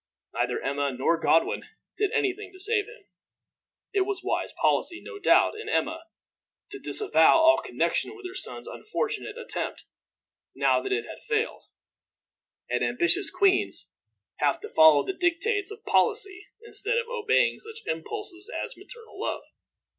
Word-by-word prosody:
Neither - - 0
Emma 140 0 -1
nor 135 +6 +1
Godwin 165 0 +2 0.3
did 415 -2 0
any 425 -4 +1
thing 410 0 -10
to 375 - -14
save 415 +1 0
him. - - -14 0.9
It 400 - +3
was 395 +1 -2
wise - - -1
policy, 345 -1 +1
no 410 - -9
doubt, - - +4
in 440 0 -7
Emma 330 -6 -1 0.7
to - - -7
disavow 420 -4 +4
all 325 0 +6
connection 430 - -1
with 400 -2 -12
her 365 - -9
son's - - -2
unfortunate 430 0 -4
attempt, 475 - -4 0.7
now - - +3
that 395 - -4
it 425 +3 0
had - - -10
failed; 440 +2 -1 1.0
and - - 0
ambitious 350 +1 +1
queens 385 -2 +1 0.5
have - - +1
to 430 - -7
follow 160 -2 +7
the 385 - -2
dictates 385 +5 0
of 425 +2 -10
policy 405 -4 +1 0.2
instead 460 +1 -1
of 470 -1 -1
obeying 475 +1 +2
such 445 0 -11
impulses 420 -4 -5
as - - -4
maternal 465 -2 -13
love. - - -2
410 Hz, 150 wpm, -27 LUFS, 360-445 Hz, 1.0 s, follow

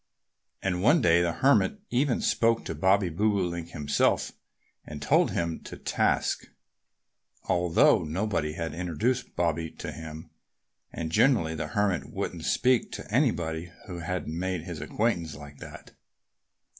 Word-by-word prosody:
And 90 -2 0
one 145 - +5
day 85 - +4
the 85 -1 +1
Hermit 140 - +3
even 130 +1 +1
spoke 115 0 +2
to - - -3
Bobby 95 +4 +3
Bobolink 90 -2 0
himself 75 -3 +1 0.5
and 75 -1 -8
took 75 - +3
him 85 -1 -2
to - - -8
task, - - 0 1.0
although 90 -2 +3
nobody 80 -2 -1
had 80 0 -4
introduced 90 - -2
Bobby 85 -1 0
to - - -7
him. 80 0 -9 0.6
And 80 -1 -4
generally 105 -7 +3
the 75 -1 -3
Hermit 100 -4 0
wouldn't - - -4
speak 125 -2 +2
to - - -7
anybody 85 - 0
who 90 -3 -7
hadn't 85 -2 -3
made 90 -1 -2
his 85 -3 -6
acquaintance 85 -2 -1
like 75 0 -12
that. - - -11
85 Hz, 135 wpm, -28 LUFS, 80-105 Hz, 1.0 s, one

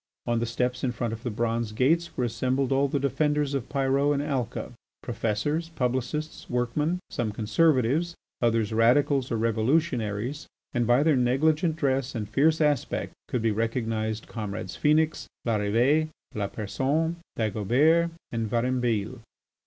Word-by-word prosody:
On 120 -1 +1
the 120 - -1
steps 125 +2 -1
in 130 - +1
front 115 -1 -3
of 115 - -6
the 125 - -3
bronze 115 0 -1
gates 165 +9 +1
were 125 - +1
assembled 130 +3 0
all 135 +1 +3
the 140 +1 -1
defenders 145 +1 +1
of 135 -2 -3
Pyrot 140 +1 +2
in 140 - 0
Alca, 130 -4 -3 0.3
professors, 120 +8 -1
publicists, 130 +4 -2
workmen, 125 +8 0
some 115 -3 -1
conservatives, 145 +7 +2 0.3
others 115 -2 +1
Radicals 130 +4 +3
or 115 - +1
Revolutionaries, 115 +2 0 0.3
and 120 -3 +1
by 120 +4 +4
their 155 -2 +4
negligent 150 +6 +2
dress 135 -3 0
and 105 -3 -3
fierce 150 +9 +3
aspect 150 -2 0
could 120 - -2
be 115 - +3
recognised 110 -1 -1
comrades 105 -5 -5
Phœnix, 155 +1 +2 0.2
Larrivée, 115 +8 +2 0.3
Lapersonne, 130 +11 -1 0.2
Dagobert, 125 - +3 0.2
and 115 -2 -2
Varambille. 120 -3 0
125 Hz, 135 wpm, -27 LUFS, 115-145 Hz, 0.3 s, by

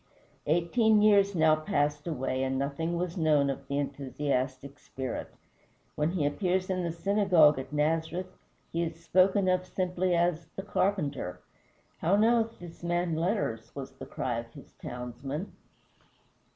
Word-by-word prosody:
Eighteen 210 +7 +3
years 200 -2 +5
now 160 -1 +5
passed 150 0 -1
away 130 -4 -2
and 135 0 0
nothing 145 +5 -2
was 175 +1 -3
known 150 -4 +3
of 135 0 -8
the 140 - -2
enthusiastic 140 -1 -2
spirit. 130 -2 -5 0.7
When 150 +1 0
he 165 -6 0
appears 185 +5 0
in 185 -1 0
the 170 -1 -1
synagogue 175 -5 +4
at 130 - -7
Nazareth, 160 +5 -1 0.4
he 170 - 0
is 165 -1 -3
spoken 185 +2 +4
of 185 0 +2
simply 185 -1 -1
as 170 -1 +1
"the 195 - -5
carpenter." 175 - -1 0.6
"How 175 +5 +3
knoweth 225 +1 +3
this 175 -1 -11
man 175 -1 0
letters?" 160 - -2
was 135 -2 -6
the - - -10
cry 120 -2 -2
of 115 0 -9
his - - -13
townsmen. 125 - -5
165 Hz, 145 wpm, -29 LUFS, 140-185 Hz, 0.7 s, years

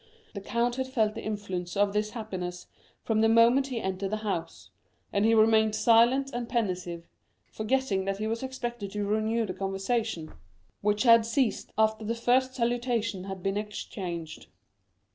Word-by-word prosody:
The 200 - -6
count 240 +4 -1
had 260 0 -1
felt 220 -5 +1
the - - -7
influence 190 -4 -4
of 200 0 +2
this 210 0 0
happiness 185 -6 -6 0.4
from 220 -1 +1
the 225 - +4
moment 235 +4 +5
he 250 -4 -3
entered 190 -1 -3
the 215 - -1
house, 185 -5 -4 0.4
and 200 +1 +2
he 225 0 +4
remained 220 -1 +4
silent 240 +5 +4
and 240 -1 -4
pensive, 180 -7 -2 0.4
forgetting 215 -4 0
that 195 0 -1
he 215 - -3
was 225 +1 -2
expected 240 -5 -5
to 205 -1 -2
renew 220 +2 0
the 185 - -4
conversation, 195 -1 -2 0.5
which 210 +2 +1
had 230 -2 +7
ceased 230 +1 -1
after 220 0 +2
the 225 +2 -2
first 255 +2 +2
salutations 235 -5 -1
had 190 -2 -6
been 195 +1 0
exchanged. 180 -6 -6
220 Hz, 160 wpm, -28 LUFS, 195-235 Hz, 0.5 s, had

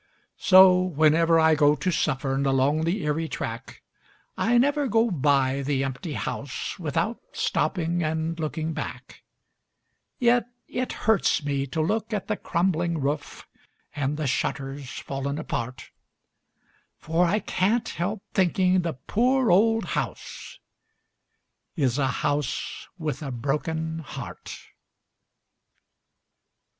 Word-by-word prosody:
So 185 -1 +7
whenever 165 -1 +3
I 160 0 +5
go 145 -1 +4
to 150 +6 -1
Suffern 135 -3 0
along 135 +4 +2
the 180 +4 -1
Erie 150 +2 -1
track 115 -3 -6 0.5
I 240 +2 +2
never 285 +3 +2
go 225 0 +2
by 140 -3 +2
the 135 -1 0
empty 135 +4 -4
house 130 - -4
without 180 +8 -1
stopping 175 -2 0
and 160 +1 -2
looking 160 +1 -2
back, - - -7 1.0
Yet 240 -2 +3 0.2
it 255 0 -3
hurts 210 -7 +1
me 140 -1 -1
to 160 +4 -2
look 220 +6 -1
at 205 - -2
the - - 0
crumbling 170 -1 0
roof 145 +2 -3 0.5
and 145 0 -1
the 155 - -2
shutters 135 +1 -2
fallen 140 +2 -4
apart, 125 -5 -5 1.1
For 165 +2 +1
I 205 - +2
can't 220 +3 0
help 195 +4 -3
thinking 185 0 +3
the 170 -2 -2
poor 250 - +1
old 225 +5 +4
house - - -5 1.2
is 135 -5 +1
a 135 - +2
house 145 +2 -2
with 155 -5 -3
a 145 - -4
broken 160 +6 -2
heart. 155 - -8
160 Hz, 120 wpm, -25 LUFS, 140-185 Hz, 1.2 s, So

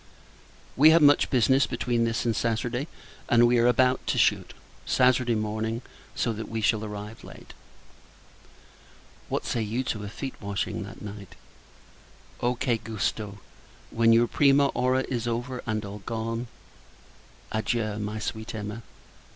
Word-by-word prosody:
We 150 +4 +7
have 165 +1 +6
much 145 0 +5
business 130 +1 +3
between 120 -1 0
this 115 +1 -1
and 115 -2 +1
Saturday: 120 +5 -1 0.4
and 120 0 +6
we 120 0 +4
are 120 +1 +5
to 125 +1 +1
shoot, - - +2 0.3
Saturday 125 -2 +3
morning; 110 +2 -2 0.3
so 115 - 0
that 110 +1 -6
we 115 - -3
shall 110 0 +1
arrive 105 +1 -7
late. - - -12 1.8
What - - -2
say 115 - -1
you 110 +4 -2
to 110 -5 -3
a 100 - -5
feet 130 +5 -6
washing 100 -1 -3
that - - -9
night? 100 -2 -9 1.1
O 120 +1 +1
che 120 -1 0
Gusto! 110 -2 -4 0.5
when 115 0 +4
your 115 +1 +5
prima 140 +2 +4
ora 130 +1 +1
is 120 -2 -2
over, 120 +2 -3
and 110 -1 -2
all 100 +1 -7
gone. 115 +1 -3 1.0
Adieu, 110 -1 -1
my 105 +1 -4
sweet 110 +1 -5
Emma! 105 +1 -5
115 Hz, 145 wpm, -26 LUFS, 110-125 Hz, 1.8 s, We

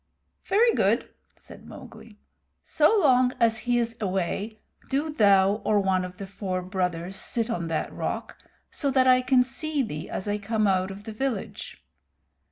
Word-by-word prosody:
"Very 455 +4 +3
good," - - +1 0.2
said - - -15
Mowgli. 210 -2 -13 0.5
"So 315 +9 +3
long 255 -6 +4
as 225 -2 +2
he 240 - +3
is 230 -1 -1
away 195 +2 -2 0.3
do 290 +3 -1
thou 200 -4 +4
or 210 -1 +2
one 190 -2 +1
of 180 0 -8
the 200 - -6
four 185 -1 -4
brothers 180 -1 -3
sit 230 +4 -1
on 170 -6 -3
that 165 -1 -3
rock, - - -4 0.4
so 285 - -1
that 260 -1 +3
I 255 0 +5
can 255 0 +4
see 280 +3 -2
thee 155 -9 -6
as 190 - -4
I 205 0 -1
come 215 +1 0
out 190 -1 +1
of 195 +1 -9
the 220 0 -7
village. 245 -2 -5
215 Hz, 170 wpm, -26 LUFS, 190-255 Hz, 0.5 s, I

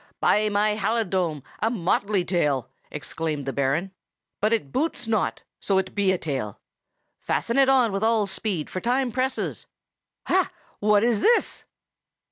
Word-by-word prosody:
"By 215 +1 +3
my 210 +1 +1
halidome, 190 - 0 0.2
a 225 - +1
motley 200 -2 0
tail!" 145 -9 0 0.2
exclaimed 150 -1 -3
the 135 - -3
Baron. 140 +8 0 0.5
"But 215 +2 +1
it 215 -12 0
boots 275 - -1
not, 220 -3 0 0.2
so 195 - +1
it 190 -1 -1
be 200 -2 +2
a 185 - +1
tail! 130 - -4 0.6
Fasten 235 +3 0
it 270 -1 +5
on 255 -4 +4
with 195 +2 -2
all 225 -2 +3
speed, 190 -4 -2
for 185 - -5
time 250 +1 +1
presses!—ha! 260 +2 -3 0.3
what 210 0 +4
is 230 -3 +2
this!" 475 0 +2
205 Hz, 145 wpm, -25 LUFS, 170-225 Hz, 0.6 s, it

